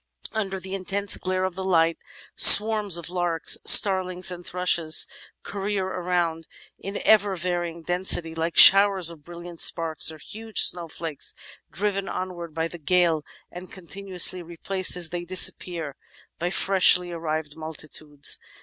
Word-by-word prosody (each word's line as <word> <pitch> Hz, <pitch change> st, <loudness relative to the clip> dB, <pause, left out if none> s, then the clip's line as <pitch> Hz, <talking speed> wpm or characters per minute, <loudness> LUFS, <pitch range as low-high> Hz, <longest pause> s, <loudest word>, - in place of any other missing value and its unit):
Under 195 Hz, -3 st, -4 dB
the 190 Hz, +1 st, -8 dB
intense 195 Hz, +1 st, 0 dB
glare 185 Hz, 0 st, -4 dB
of 185 Hz, -1 st, -3 dB
the 190 Hz, +1 st, -7 dB
light, 165 Hz, -3 st, 0 dB, 0.4 s
swarms 210 Hz, -3 st, +6 dB
of 170 Hz, 0 st, -9 dB
larks, 175 Hz, -3 st, 0 dB
starlings, 185 Hz, -2 st, +5 dB
and 175 Hz, 0 st, -9 dB
thrushes 170 Hz, -3 st, +1 dB, 0.4 s
career 200 Hz, -1 st, -4 dB
around 175 Hz, -3 st, -3 dB, 0.3 s
in 200 Hz, +1 st, -7 dB
ever 205 Hz, -2 st, +3 dB
varying 175 Hz, -1 st, -5 dB
density, 175 Hz, -2 st, 0 dB
like 165 Hz, +1 st, -4 dB
showers 195 Hz, -3 st, +7 dB
of 155 Hz, -3 st, -16 dB
brilliant 170 Hz, 0 st, -12 dB
sparks 165 Hz, -1 st, +1 dB
or 160 Hz, -, -12 dB
huge 220 Hz, +7 st, -4 dB
snowflakes 165 Hz, -3 st, -2 dB, 0.3 s
driven 200 Hz, 0 st, -3 dB
onwards 175 Hz, -3 st, -7 dB
by 165 Hz, 0 st, -2 dB
the 175 Hz, +1 st, -12 dB
gale, 170 Hz, 0 st, 0 dB, 0.3 s
and 180 Hz, +1 st, -11 dB
continuously 185 Hz, 0 st, -3 dB
replaced 180 Hz, +2 st, -4 dB
as 170 Hz, -3 st, -4 dB
they 175 Hz, 0 st, -5 dB
disappear 175 Hz, -4 st, -1 dB, 0.4 s
by 175 Hz, -, -3 dB
freshly 180 Hz, -2 st, +2 dB
arrived 155 Hz, -3 st, -5 dB
multitudes. 155 Hz, -2 st, -5 dB
175 Hz, 135 wpm, -23 LUFS, 165-190 Hz, 0.4 s, showers